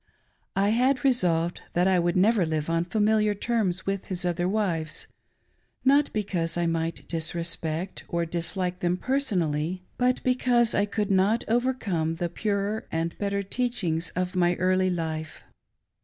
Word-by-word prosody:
I 200 Hz, +1 st, +3 dB
had 255 Hz, +4 st, +2 dB
resplved 175 Hz, -10 st, +2 dB
that 175 Hz, +2 st, +3 dB
I 185 Hz, -1 st, +4 dB
would 175 Hz, +1 st, +1 dB
never 205 Hz, +1 st, +4 dB
live 160 Hz, -1 st, -1 dB
on 165 Hz, +1 st, +1 dB
familiaf 210 Hz, +2 st, +2 dB
tprms 205 Hz, -6 st, 0 dB
with 195 Hz, -1 st, -2 dB
his 180 Hz, -2 st, -3 dB
other 175 Hz, 0 st, 0 dB
wives^ 180 Hz, -6 st, -1 dB, 0.4 s
— -, -, -42 dB
not 280 Hz, +2 st, +4 dB
because 180 Hz, -6 st, -1 dB
I 175 Hz, -, +1 dB
might 165 Hz, 0 st, -2 dB
disrespecjt 165 Hz, +1 st, -2 dB
or 170 Hz, 0 st, -1 dB
dislike 180 Hz, +2 st, -2 dB
them 175 Hz, 0 st, 0 dB
personally, 185 Hz, -, -1 dB, 0.2 s
but 250 Hz, 0 st, +2 dB
because 245 Hz, -2 st, +3 dB
I 205 Hz, 0 st, +2 dB
could 205 Hz, 0 st, -1 dB
not 195 Hz, +4 st, +3 dB
overcome 220 Hz, -10 st, 0 dB
the 175 Hz, +1 st, -2 dB
purer 205 Hz, +3 st, -2 dB
and 165 Hz, +1 st, -2 dB
better 200 Hz, -1 st, -1 dB
tpacbings 195 Hz, -7 st, -1 dB
of 180 Hz, +1 st, -2 dB
my 175 Hz, -1 st, +3 dB
early 185 Hz, +1 st, +2 dB
life. 160 Hz, -2 st, -4 dB
185 Hz, 150 wpm, -26 LUFS, 170-215 Hz, 0.4 s, I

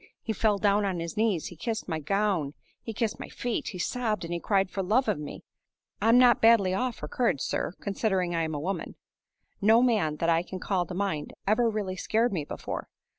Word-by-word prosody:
He 220 Hz, -, -2 dB
fell 215 Hz, -1 st, +2 dB
down 205 Hz, +1 st, +2 dB
on 190 Hz, -3 st, -1 dB
his 165 Hz, 0 st, -5 dB
knees; 210 Hz, -7 st, +1 dB
he 175 Hz, -, -11 dB
kissed 225 Hz, +6 st, -3 dB
my 160 Hz, -3 st, -2 dB
gown, 180 Hz, -3 st, 0 dB, 0.3 s
he 225 Hz, -, -5 dB
kissed 225 Hz, 0 st, -2 dB
my -, -, -7 dB
feet; 245 Hz, -1 st, -3 dB
he 185 Hz, -, -5 dB
sobbed 215 Hz, 0 st, -1 dB
and 170 Hz, 0 st, -3 dB
cried 195 Hz, -3 st, +1 dB
for 195 Hz, -, -2 dB
love 220 Hz, +8 st, +2 dB
of 210 Hz, -8 st, 0 dB
me. 150 Hz, -, -7 dB, 0.6 s
I'm 225 Hz, +3 st, +5 dB
not 250 Hz, -2 st, +6 dB
badly 225 Hz, -5 st, +5 dB
off 250 Hz, +4 st, -1 dB
for -, -, -7 dB
courage, 230 Hz, -, 0 dB
sir, -, -, -2 dB
considering 190 Hz, -4 st, 0 dB
I'm 160 Hz, -2 st, -1 dB
a -, -, -2 dB
woman. 185 Hz, +6 st, -4 dB, 0.7 s
No 225 Hz, +4 st, +5 dB
man, 210 Hz, -12 st, +2 dB
that 165 Hz, -, -1 dB
I 165 Hz, 0 st, +4 dB
can 185 Hz, +2 st, -7 dB
call 185 Hz, -2 st, -1 dB
to 180 Hz, -, -6 dB
mind, 175 Hz, -7 st, -2 dB
ever 230 Hz, +3 st, +3 dB
really 200 Hz, -4 st, -3 dB
scared 225 Hz, +4 st, +1 dB
me 160 Hz, -5 st, -1 dB
before. -, -, -5 dB
200 Hz, 210 wpm, -28 LUFS, 175-225 Hz, 0.7 s, not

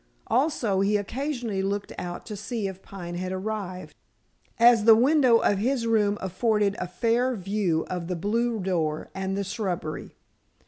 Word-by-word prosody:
Also 245 Hz, -7 st, +1 dB
he 200 Hz, +2 st, +3 dB
occasionally 240 Hz, -1 st, -3 dB
looked 200 Hz, +1 st, -2 dB
out 175 Hz, 0 st, -6 dB
to 215 Hz, -, -6 dB
see 215 Hz, 0 st, -3 dB
if 190 Hz, 0 st, -8 dB
Pine 175 Hz, -4 st, -8 dB
had 185 Hz, +1 st, -3 dB
arrived, 190 Hz, -1 st, -4 dB, 0.6 s
as 235 Hz, -2 st, +6 dB
the 225 Hz, -1 st, +9 dB
window 255 Hz, 0 st, +5 dB
of 205 Hz, -3 st, +2 dB
his 245 Hz, +2 st, 0 dB
room 210 Hz, -3 st, +2 dB
afforded 205 Hz, +2 st, +1 dB
a 180 Hz, -, -3 dB
fair 235 Hz, +7 st, +1 dB
view 195 Hz, -4 st, -1 dB
of 175 Hz, -2 st, -4 dB
the 180 Hz, -, -2 dB
blue 225 Hz, +6 st, 0 dB
door 165 Hz, -5 st, -1 dB
and 190 Hz, 0 st, -3 dB
the 200 Hz, -, -1 dB
shrubbery. 185 Hz, -6 st, -4 dB
205 Hz, 155 wpm, -26 LUFS, 185-230 Hz, 0.6 s, the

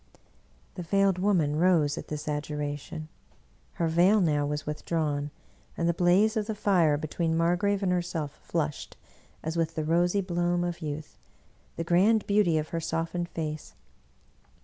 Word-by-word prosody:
" -, -, -34 dB
The 180 Hz, -, -6 dB
Veiled 195 Hz, +1 st, +2 dB
Woman 175 Hz, -7 st, +2 dB
rose 160 Hz, -4 st, +3 dB
at -, -, -7 dB
this 150 Hz, 0 st, -5 dB
adjuration. 150 Hz, +1 st, -4 dB, 0.7 s
Her 170 Hz, -, -1 dB
veil 175 Hz, +6 st, +4 dB
now 150 Hz, -5 st, +1 dB
was 150 Hz, +1 st, -3 dB
withdrawn, 150 Hz, -1 st, -2 dB, 0.5 s
and 170 Hz, -, 0 dB
the 170 Hz, -, +3 dB
blaze 185 Hz, +6 st, +3 dB
of 215 Hz, -1 st, -1 dB
the 220 Hz, -, -2 dB
fire 180 Hz, -8 st, +3 dB
between 160 Hz, +2 st, -1 dB
Mar 170 Hz, +1 st, +3 dB
grave 200 Hz, +2 st, 0 dB
and 185 Hz, -, +1 dB
herself 170 Hz, -4 st, -2 dB
flushed, 155 Hz, -3 st, -3 dB, 0.5 s
as 160 Hz, +1 st, -3 dB
with 165 Hz, -1 st, -1 dB
the 155 Hz, -, -1 dB
rosy 175 Hz, +5 st, +2 dB
bloom 175 Hz, -1 st, 0 dB
of 175 Hz, 0 st, -3 dB
youth, 150 Hz, 0 st, -6 dB, 0.6 s
the 165 Hz, -, -3 dB
grand 195 Hz, +6 st, +3 dB
beauty 200 Hz, -6 st, +3 dB
of 155 Hz, 0 st, -2 dB
her 165 Hz, -, -2 dB
softened 165 Hz, +2 st, -2 dB
face. 155 Hz, -2 st, -5 dB
165 Hz, 160 wpm, -28 LUFS, 155-180 Hz, 0.7 s, veil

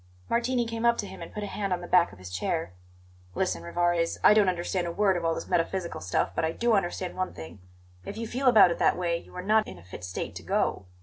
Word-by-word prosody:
Martini 240 Hz, +1 st, +1 dB
came 230 Hz, 0 st, -4 dB
up 235 Hz, 0 st, +4 dB
to 205 Hz, -, -2 dB
him 190 Hz, -2 st, -10 dB
and 170 Hz, -, -8 dB
put 210 Hz, -, -5 dB
a -, -, -2 dB
hand 200 Hz, -1 st, -3 dB
on 180 Hz, -, +1 dB
the 175 Hz, -, -7 dB
back 180 Hz, -1 st, +4 dB
of 100 Hz, -, -14 dB
his 90 Hz, 0 st, -10 dB
chair. 95 Hz, -, -2 dB, 0.6 s
"Listen, 85 Hz, -, -1 dB
Rivarez; 170 Hz, -, 0 dB
I -, -, +8 dB
don't 210 Hz, -3 st, +4 dB
understand 175 Hz, 0 st, -1 dB
a -, -, -2 dB
word 195 Hz, +1 st, +2 dB
of 175 Hz, -, -2 dB
all 165 Hz, 0 st, +1 dB
this -, -, -6 dB
metaphysical 175 Hz, -, -1 dB
stuff, 90 Hz, +2 st, 0 dB
but -, -, -1 dB
I 160 Hz, 0 st, 0 dB
do 235 Hz, +4 st, +1 dB
understand 185 Hz, -2 st, -1 dB
one 185 Hz, 0 st, -3 dB
thing: 80 Hz, +3 st, -9 dB, 0.4 s
If 205 Hz, -, -7 dB
you 230 Hz, -, -3 dB
feel 255 Hz, +4 st, -1 dB
about 215 Hz, -7 st, +7 dB
it -, -, -3 dB
that -, -, +3 dB
way, 170 Hz, -2 st, 0 dB
you 170 Hz, -, -14 dB
are 180 Hz, -, -5 dB
not 215 Hz, +2 st, +3 dB
in -, -, -9 dB
a 85 Hz, -, -14 dB
fit 90 Hz, 0 st, -10 dB
state 90 Hz, 0 st, -5 dB
to -, -, -8 dB
go. 95 Hz, -, -1 dB
180 Hz, 265 wpm, -27 LUFS, 165-210 Hz, 0.6 s, I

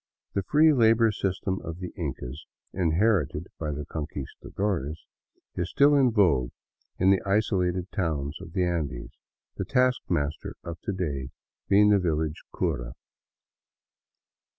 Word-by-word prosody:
The 100 Hz, -, +1 dB
free 150 Hz, +10 st, +5 dB
labor 115 Hz, -3 st, +5 dB
system 95 Hz, -1 st, -2 dB
of 85 Hz, 0 st, -6 dB
the 90 Hz, -1 st, -7 dB
Incas, 70 Hz, -4 st, -5 dB, 0.3 s
inherited 90 Hz, -2 st, +1 dB
by 80 Hz, -, -2 dB
the 75 Hz, 0 st, -4 dB
Conquistadores, 80 Hz, +2 st, -4 dB, 0.5 s
is 90 Hz, 0 st, -2 dB
still 145 Hz, +7 st, +5 dB
in 135 Hz, -3 st, +5 dB
vogue 85 Hz, -, +3 dB, 0.5 s
in 95 Hz, +1 st, +4 dB
the 95 Hz, -, +3 dB
isolated 95 Hz, -3 st, 0 dB
towns 80 Hz, -6 st, -2 dB
of 85 Hz, -, -10 dB
the 95 Hz, -2 st, +1 dB
Andes, 80 Hz, -8 st, -2 dB, 0.5 s
the -, -, -1 dB
taskmaster 85 Hz, -, 0 dB
of 85 Hz, -1 st, -6 dB
to -, -, 0 dB
day 70 Hz, -9 st, -3 dB, 0.4 s
being 105 Hz, +1 st, +6 dB
the 105 Hz, -1 st, +5 dB
village 80 Hz, -3 st, -1 dB
cura. -, -, -2 dB
90 Hz, 130 wpm, -27 LUFS, 75-100 Hz, 0.5 s, being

